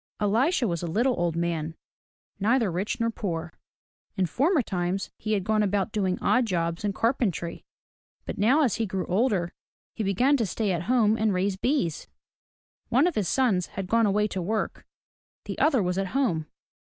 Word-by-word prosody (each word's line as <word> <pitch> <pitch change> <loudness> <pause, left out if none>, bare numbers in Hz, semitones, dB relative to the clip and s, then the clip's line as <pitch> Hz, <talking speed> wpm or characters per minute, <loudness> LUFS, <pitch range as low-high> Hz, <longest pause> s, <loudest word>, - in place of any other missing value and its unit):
Elisha 240 - +2
was 170 -3 -2
a 175 - -3
little 235 +10 +2
old 170 -2 0
man, 165 -2 -2 0.6
neither 225 0 +2
rich 185 +7 -2
nor 230 0 +1
poor. 170 -7 -4 0.6
In 190 - +2
former 285 - +2
times 185 0 -2
he 215 0 -2
had 200 -3 0
gone 215 +2 +1
about 200 +1 0
doing 190 -4 0
odd 250 -2 +3
jobs 170 -2 -1
in 205 - +1
carpentry; 200 - -1 0.6
but - - -5
now 260 +9 +4
as 245 -8 +1
he 225 - -1
grew 190 -1 -3
older, 190 -3 +1 0.4
he 220 - -3
began 245 +9 +3
to 230 - 0
stay 205 +2 -1
at 170 -1 -2
home 225 -3 +3
and 215 -3 +1
raise 190 +1 0
bees. 190 - -1 0.8
One 265 +6 +4
of 355 - +1
his 210 -8 -1
sons 205 -6 +2
had 195 - -2
gone 230 +3 +3
away 210 +1 +2
to 190 - -3
work, 215 +5 -3 0.6
the - - -5
other 270 -9 +3
was 180 +1 -1
at 195 - -1
home. 170 - 0
205 Hz, 180 wpm, -26 LUFS, 180-230 Hz, 0.8 s, now